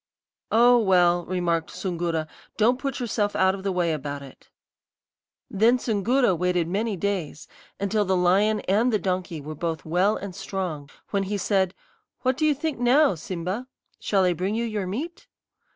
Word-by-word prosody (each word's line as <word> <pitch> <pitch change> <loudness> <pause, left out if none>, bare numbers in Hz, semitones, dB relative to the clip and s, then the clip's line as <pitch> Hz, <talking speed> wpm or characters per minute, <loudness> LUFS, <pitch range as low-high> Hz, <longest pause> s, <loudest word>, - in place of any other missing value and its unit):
"'Oh, 240 +2 +6
well,' 175 -4 +3
remarked 170 -3 -1
Soongoora; 170 -3 -2 0.3
'don't 240 +4 +3
put 275 -1 -3
yourself 210 -4 -1
out 190 0 +3
of 195 - -6
the 195 0 -1
way 175 -3 +1
about 145 -1 -5
it.' 135 - -15 1.0
"Then 225 +5 +3
Soongoora 235 0 +1
waited 180 -1 0
many 205 +3 -1
days, 170 -5 -3 0.3
until 205 +2 +1
the 190 -1 +1
lion 200 +5 +3
and 220 +6 +2
the 215 - +3
donkey 180 -4 -2
were 155 +2 -6
both 165 0 -4
well 180 +6 +2
and 200 -2 -7
strong, 185 -6 -5 0.2
when 200 - +1
he 200 +1 -2
said: 190 -1 +1 0.5
'What 255 0 +1
do 310 +3 +1
you 300 - +3
think 295 -2 -3
now, 265 +3 +4
Simba? 185 +7 -4 0.3
Shall 195 -2 +1
I 180 -1 +3
bring 185 +5 -2
you 235 +1 -1
your 210 -4 -3
meat?' 290 - -5
195 Hz, 170 wpm, -25 LUFS, 175-220 Hz, 1.0 s, Oh